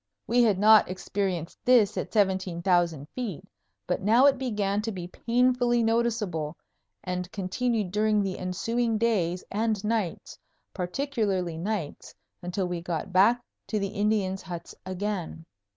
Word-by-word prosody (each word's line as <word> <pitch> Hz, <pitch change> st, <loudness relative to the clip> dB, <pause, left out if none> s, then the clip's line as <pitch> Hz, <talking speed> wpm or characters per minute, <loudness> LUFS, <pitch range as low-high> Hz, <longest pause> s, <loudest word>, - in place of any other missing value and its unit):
We 245 Hz, +1 st, +3 dB
had 215 Hz, -5 st, +4 dB
not 215 Hz, +1 st, +6 dB
experienced 185 Hz, -2 st, -3 dB
this 235 Hz, -5 st, +4 dB
at -, -, -3 dB
17,000 175 Hz, -6 st, +1 dB
feet, 230 Hz, -, -5 dB, 0.4 s
but -, -, -1 dB
now 225 Hz, +7 st, +5 dB
it 275 Hz, -2 st, +4 dB
began 210 Hz, -5 st, -1 dB
to 225 Hz, +1 st, -3 dB
be 180 Hz, -3 st, -6 dB
painfully 245 Hz, +3 st, +2 dB
noticeable, 220 Hz, -9 st, 0 dB, 0.5 s
and 180 Hz, 0 st, -4 dB
continued 210 Hz, +1 st, -1 dB
during 210 Hz, 0 st, +2 dB
the 190 Hz, -1 st, -3 dB
ensuing 225 Hz, +5 st, -1 dB
days 185 Hz, -6 st, 0 dB
and 215 Hz, -1 st, 0 dB
nights, 215 Hz, -5 st, -2 dB, 0.3 s
particularly 195 Hz, -, -1 dB
nights, 190 Hz, -4 st, -4 dB, 0.3 s
until 180 Hz, +2 st, -2 dB
we 175 Hz, -1 st, -3 dB
got 175 Hz, +1 st, -4 dB
back 230 Hz, +6 st, +4 dB, 0.2 s
to 215 Hz, -, -1 dB
the 200 Hz, -1 st, -1 dB
Indians' 205 Hz, -2 st, 0 dB
huts 175 Hz, -2 st, -7 dB
again. 185 Hz, -4 st, -4 dB
200 Hz, 135 wpm, -27 LUFS, 180-225 Hz, 0.5 s, not